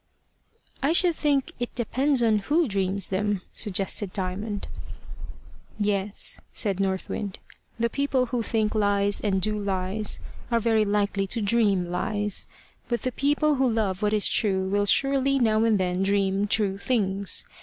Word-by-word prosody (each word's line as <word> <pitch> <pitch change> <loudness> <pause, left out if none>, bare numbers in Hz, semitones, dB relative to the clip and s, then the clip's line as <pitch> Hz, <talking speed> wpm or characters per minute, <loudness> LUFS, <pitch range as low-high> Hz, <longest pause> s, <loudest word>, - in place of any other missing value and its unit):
"I 285 +4 +2
should 350 0 +4
think 285 -4 0
it 245 - -4
depends 255 +2 +1
a - - +4
little 215 - +3
on - - -11 0.2
who - - -2
dreams 195 -1 -1
them," 200 0 -1
suggested 195 -1 -1
Diamond. 200 +2 -3 1.1
"Yes," 205 -1 0
said 200 -3 -1
North 190 -1 -1
Wind. 200 -2 -4 0.4
"The 235 - +2
people 270 0 0
who 240 0 -2
think 220 -1 0
lies, 205 -1 +2
and 195 -3 +1
do 210 +3 0
lies, 195 +1 -1 0.3
are 235 -1 +2
very 220 -1 +2
likely 200 -1 0
to 230 - -1
dream 200 -5 +2
lies. 205 +2 -1 0.4
But 240 -3 -2
the 255 - -1
people 290 +3 +1
who 260 -1 +2
love 205 -4 -1
what 210 -1 +1
is 210 -1 +2
true 190 -3 +1
will 205 +1 +1
surely 275 +3 +3
now 220 -3 +2
and 220 -3 +3
then 180 0 0
dream 195 0 +1
true 200 -2 0
things. 200 -5 0
210 Hz, 160 wpm, -25 LUFS, 195-235 Hz, 1.1 s, should